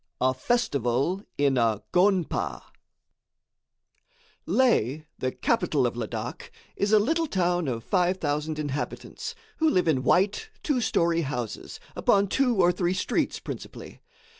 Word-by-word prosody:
A 130 0 +3
Festival 140 - 0 0.2
in 140 -3 +2
a 110 -3 +1
Gonpa 185 -1 +1 1.8
Leh, 155 - +2 0.2
the 130 - -1
capital - - +1
of - - -1
Ladak, - - -5 0.3
is 200 +1 0
a 215 - +7
little 320 +10 +1
town 175 - 0
of 115 -3 -3
5,000 160 -5 0
inhabitants, 145 -1 -4 0.2
who 320 -1 +3
live 180 - +2
in 140 -5 +2
white, 195 - +2
two 275 -5 +1
story 170 -5 +2
houses, 130 -7 -5 0.2
upon 200 -1 +3
two 255 0 +2
or 180 -3 +4
three 180 0 0
streets, 185 - -1
principally. - - -8
175 Hz, 125 wpm, -26 LUFS, 140-200 Hz, 1.8 s, a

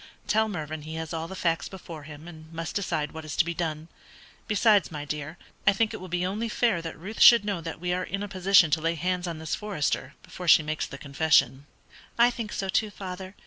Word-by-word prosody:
Tell 220 +1 +2
Mervyn 155 -5 -5
he 155 +2 -7
has 160 0 -5
all 165 0 -3
the 190 - -8
facts 165 -3 0
before 170 -5 -9
him, 150 +2 -11
and 160 -2 -12
must 165 0 -5
decide 155 -7 -1
what 160 0 -8
is 155 -1 -6
to - - +3
be 170 - -2
done. 160 -2 -3 0.6
Besides, 210 -1 +4
my 150 -2 -5
dear, 150 +2 -5 0.3
I 200 - +7
think 215 +2 +1
it - - -4
will 185 - -9
be 180 +1 -1
only 215 +5 -2
fair 220 -6 +1
that 165 -1 -7
Ruth 200 +7 -8
should 235 -4 +9
know 200 -5 -2
that 165 -1 -6
we 180 +1 -1
are 180 - -1
in 195 +1 -4
a - - -4
position 190 -3 +4
to 160 - +2
lay 165 +1 0
hands 180 +2 -1
on 170 -2 -4
this 160 0 -4
Forester 200 -8 -2
before 180 - -8
she 160 - +7
makes 155 0 -2
the 140 - -9
confession." 140 -2 +2 0.5
"I 240 +1 +6
think 230 -3 -5
so 195 - -3
too, 210 +3 +1
father. 190 -1 -8
170 Hz, 235 wpm, -27 LUFS, 155-195 Hz, 0.6 s, should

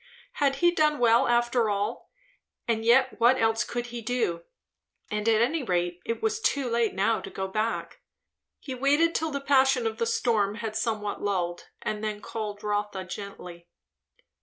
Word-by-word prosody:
Had 275 -1 +3
he 345 - +7
done 305 -3 +2
well 240 +1 +4
after 240 -1 +2
all? 205 0 -2 0.6
And 225 -1 0
yet 250 +2 +3
what 245 +3 +5
else 225 0 +2
could 240 0 -4
he 240 - -4
do? 225 -8 -1 0.7
And 210 +1 0
at 220 0 +4
any 300 +6 0
rate 175 -5 -1
it 230 - -3
was 440 0 0
too 280 - +1
late 235 -3 0
now 210 +4 +1
to - - -8
go 190 0 -4
back. 215 +4 -2 0.6
He 265 - -6
waited 290 +6 +2
till 320 - -1
the 280 -2 -3
passion 265 -3 +3
of 225 +1 -2
the 230 - +1
storm 215 -4 +1
had 220 -1 -5
somewhat 215 -2 -2
lulled, 175 -4 -2 0.2
and 215 0 -3
then 215 -1 -2
called 210 -1 -6
Rotha 205 -2 -2
gently. 180 -3 -9
225 Hz, 170 wpm, -27 LUFS, 205-255 Hz, 0.7 s, he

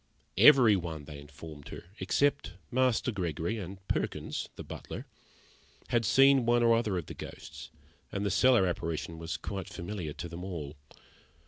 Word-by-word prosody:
Every 130 -8 +8
one, 80 -5 -4
they 75 -1 -9
informed 75 0 -11
her, - - -8 0.2
except 145 0 +1 0.2
Master 130 -1 +2
Gregory 90 +2 -2
and 95 0 -8
Perkins - - -2
(the - - -7
butler) - - -8 0.8
had 120 -1 +2
seen 135 +4 +6
one 120 0 +3
or 115 -1 +5
other 110 -5 0
of 85 - -3
the - - -8
ghosts, - - -9 0.4
and 100 0 -2
the 100 - +1
cellar 125 -1 +5
apparition 85 -2 -3
was 80 +1 -4
quite 95 -3 -5
familiar 85 -4 -5
to 85 - -6
them 85 +1 -8
all. 80 -6 -6
95 Hz, 155 wpm, -30 LUFS, 80-115 Hz, 0.8 s, Every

